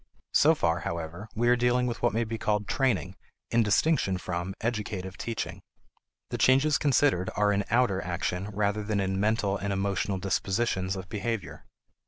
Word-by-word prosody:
So 160 +2 +5
far, 85 - +1
however, 85 +5 -5
we 120 +2 +1
are 120 - +6
dealing 125 +1 +2
with 120 -2 -3
what 120 - +3
may 115 +2 0
be 115 0 -4
called 105 -1 0
training 125 - 0 0.3
in 115 - +4
distinction 105 - +2
from 90 +1 -4
educative 105 -5 -3
teaching. 115 +2 -4 0.7
The - - -3
changes 135 +4 +4
considered 135 -9 +2
are 105 0 +3
in 100 0 +1
outer 115 -5 +2
action 90 +1 -2
rather 105 +1 0
than 105 0 -1
in 95 0 -1
mental 105 -1 +1
and 100 +1 -3
emotional 100 0 -1
dispositions 95 0 -1
of 95 -1 -7
behavior. 105 0 -4
105 Hz, 165 wpm, -28 LUFS, 95-120 Hz, 0.7 s, are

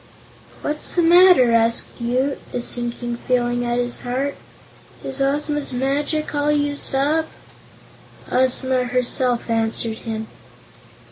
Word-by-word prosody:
"What's 300 +1 -3
the 350 - +3
matter?" 345 -7 +6
asked 230 0 +4 0.2
Woot, 255 +4 0 0.2
a - - 0
sinking 240 0 -4
feeling 245 -1 0
at 240 0 -1
his 245 0 0
heart. 265 +3 -2 0.7
"Is 270 +1 -4
Ozma's 290 0 0
magic 285 +5 -1
all 290 0 +1
used 290 -2 0
up?" 305 +4 +1 1.0
Ozma 260 0 +1
herself 250 0 0
answered 225 0 -1
him. 220 -1 -5
255 Hz, 115 wpm, -21 LUFS, 240-290 Hz, 1.0 s, matter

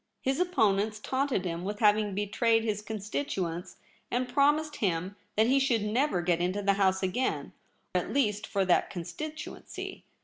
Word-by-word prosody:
His 265 +3 +1
opponents 215 - +2
taunted 260 -4 -1
him 170 0 -3
with 205 +2 -3
having 210 -2 +3
betrayed 225 +3 +2
his 210 -2 -1
constituents, 200 -5 -3 0.3
and 250 +1 0
promised 295 +3 +2
him 185 -2 -1 0.2
that 220 - +4
he 265 +4 +4
should 245 -5 +2
never 215 -3 +1
get 175 -1 +1
into 185 +3 0
the 200 0 +4
House 190 -1 +2
again 195 +8 -1 0.2
— - - -43
at - - 0
least 215 -6 +1
for 195 -2 0
that 180 - +3
con 175 -3 -5
stituency. 310 - -7
210 Hz, 165 wpm, -29 LUFS, 190-260 Hz, 0.3 s, that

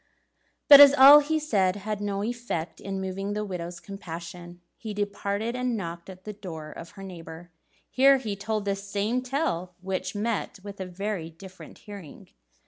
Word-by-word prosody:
But 285 -1 +11
as 285 -1 +10
all 280 +2 +10
he 305 +2 0
said 200 -12 +1
had 205 +1 -4
no 200 -1 -2
effect 235 -8 -4
in 195 -1 -4
moving 195 +2 -4
the 210 0 -2
widow's 175 -2 -6
compassion, 175 -2 -9 0.2
he 215 -2 -7
departed, 205 +2 -2
and 250 -2 -1
knocked 170 -2 -6
at 185 0 -12
the 210 - -7
door 165 -7 -8
of 165 - -10
her 195 - -8
neighbour. 175 -2 -10 0.4
Here 275 +1 +5
he 220 -6 -4
told 215 +1 -3
the 200 -1 0
same 200 +5 -2
tale, 215 - -2
which 190 +2 -4
met 210 0 -2
with 200 -1 -9
a 190 - -4
very 185 -2 -4
different 185 +3 -13
hearing. 200 -8 -11
200 Hz, 170 wpm, -26 LUFS, 180-220 Hz, 0.4 s, But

